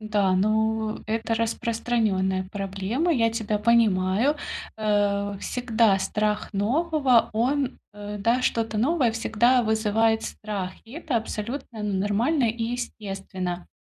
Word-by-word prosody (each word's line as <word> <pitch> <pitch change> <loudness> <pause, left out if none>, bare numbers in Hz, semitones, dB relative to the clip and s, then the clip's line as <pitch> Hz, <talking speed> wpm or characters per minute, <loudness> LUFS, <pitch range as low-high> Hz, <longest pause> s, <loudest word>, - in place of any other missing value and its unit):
Да, 210 -3 +1
ну, 220 +2 +1
это 225 +1 -1
распространённая 220 -4 0
проблема, 200 - -1
я 230 -6 +2
тебя 220 -2 -1
понимаю, 215 +3 +3 0.4
э. 205 -1 0
Всегда 230 -5 +2
страх 210 +2 -1
нового, 260 - +2
он, 260 +4 0
э, 205 0 -7
да, 235 +5 +1
что-то 225 -3 0
новое 265 -1 +2
всегда 235 +3 +2
вызывает 220 0 +2
страх. 200 -4 -5
И 225 - -15
это 305 -5 -2
абсолютно 225 +1 -4
нормально 210 +8 +1
и 230 +1 -5
естественно. 195 -6 -5
220 Hz, 115 wpm, -25 LUFS, 205-235 Hz, 0.4 s, понимаю